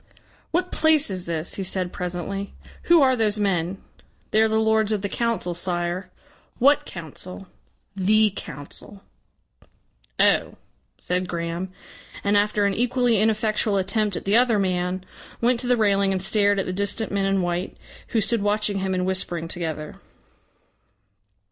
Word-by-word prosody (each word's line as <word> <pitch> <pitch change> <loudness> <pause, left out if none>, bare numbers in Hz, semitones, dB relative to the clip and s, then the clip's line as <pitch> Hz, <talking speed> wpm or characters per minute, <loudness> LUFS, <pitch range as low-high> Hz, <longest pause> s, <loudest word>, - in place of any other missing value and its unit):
"What 365 +2 -1
place 310 -6 +3
is 185 -1 -4
this?" 165 -1 -3
he 195 - -3
said 185 -1 -1
presently. 180 +3 -4 0.3
"Who 335 -3 +6
are 260 -1 +4
those 215 -3 +1
men?" 190 -3 0 0.5
"They 215 - +4
are 220 - +5
the 220 0 +1
lords 220 -1 +2
of 210 -2 -1
the - - +1
Council, 230 -7 -1
Sire." 175 +1 -3 0.5
"What 280 +3 +4
Council?" 180 +3 -7 0.5
"The 210 +2 +3
Council." 165 +5 -9 1.2
"Oh!" - - +3 0.4
said 180 +1 -2
Graham, 170 +2 -3 0.5
and 205 0 +2
after 205 0 +2
an 200 - +2
equally 245 -1 +2
ineffectual 215 -1 +1
attempt 200 +1 0
at - - -5
the 200 +2 +2
other 240 -2 +4
man, 185 -1 -1 0.3
went 240 0 +2
to 250 - -3
the 245 0 +3
railing 200 -2 +3
and 190 - 0
stared 205 +1 +2
at 195 - 0
the 185 - -3
distant 200 +3 -1
men 195 -1 0
in 195 -1 +1
white, 175 +1 -3 0.3
who 225 - +1
stood 225 +1 +1
watching 205 -1 +1
him 190 0 -1
and 180 0 0
whispering 175 -3 -2
together. 160 -3 -5
200 Hz, 155 wpm, -24 LUFS, 180-220 Hz, 1.2 s, Who